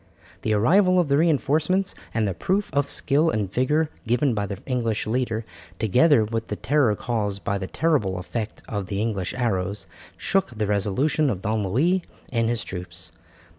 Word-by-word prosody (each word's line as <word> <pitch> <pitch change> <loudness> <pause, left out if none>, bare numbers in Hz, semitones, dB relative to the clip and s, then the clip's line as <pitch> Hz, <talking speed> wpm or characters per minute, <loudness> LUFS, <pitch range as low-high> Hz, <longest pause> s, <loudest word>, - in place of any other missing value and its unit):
The 110 - 0
arrival 185 - +4
of 170 -5 +1
the 140 - +4
reinforcements 160 +4 +2 0.2
and 110 -2 0
the 95 - -1
proof 190 - -1
of 140 0 +1
skill 150 +4 +2
and 105 - -2
vigour 150 +5 +1 0.2
given 125 +3 +2
by 105 -2 -1
the 100 0 -5
English 115 -4 -1
leader, 115 -1 -1 0.3
together 125 - +4
with 115 +1 -3
the 105 - -3
terror 120 -1 +2
caused 105 -3 -2
by 100 0 -1
the 95 - -4
terrible 125 - +1
effect 105 +4 -5
of 100 -3 -3
the 100 +1 -3
English 105 -5 -2
arrows, 100 -5 -1 0.3
shook 180 - 0
the 105 - 0
resolution 105 +10 +1
of 95 -6 -3
Don 110 -1 0
Louis 165 - +2 0.3
and 115 -1 +2
his 120 -1 -1
troops. 90 -1 -7
115 Hz, 170 wpm, -24 LUFS, 105-145 Hz, 0.3 s, arrival